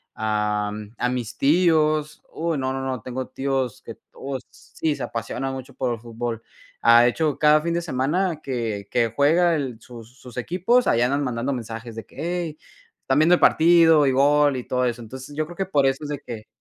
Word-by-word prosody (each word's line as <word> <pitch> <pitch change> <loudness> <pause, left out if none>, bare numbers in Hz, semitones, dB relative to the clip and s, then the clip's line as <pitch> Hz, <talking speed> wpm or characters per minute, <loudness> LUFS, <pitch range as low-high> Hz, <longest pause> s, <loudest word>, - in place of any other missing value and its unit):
ah, 105 -1 -1 0.3
a 125 - 0
mis 125 -3 -4
tíos, 155 -1 +2
uy, 165 -2 -2
no, 130 0 -1
no, 135 - -3
no, 130 -3 -3
tengo 130 +2 -5
tíos 130 -3 -2
que - - -9 0.2
todos 135 -2 -6
sí, 155 -2 -4
se - - -6
apasionan 125 +4 -4
mucho 130 +1 -8
por 125 -2 -1
el 115 - -6
fútbol. 115 0 -5 0.4
Ha 115 +1 +7
hecho, 150 +4 0
cada 150 0 +5
fin 170 +1 -2
de 170 - 0
semana 160 +3 -1
que 115 -6 -3
que 115 -2 +1
juega 165 +5 +3
el 130 -5 -4
sus 120 +1 -13
sus 125 -1 -12
equipos, 185 - +1
ahí 115 - +3
andan 140 +4 +1
mandando 125 0 -2
mensajes 115 -1 -7
de 115 - -7
que: - - -22
“Hey, 170 0 -3 0.4
¿están 135 +2 +1
viendo 165 +3 +6
el - - -3
partido?”, 165 -2 +5
y 135 - +3
“gol”, 145 +1 +3
y 125 - -6
todo 125 0 0
eso. 120 -1 -2
Entonces, 130 +5 -9
yo 155 +1 -1
creo 175 +2 -11
que 195 - -2
por 145 -7 +2
eso 135 +2 0
es 150 - -5
de 145 - -3
que 110 -3 -9
135 Hz, 205 wpm, -23 LUFS, 120-155 Hz, 0.4 s, Ha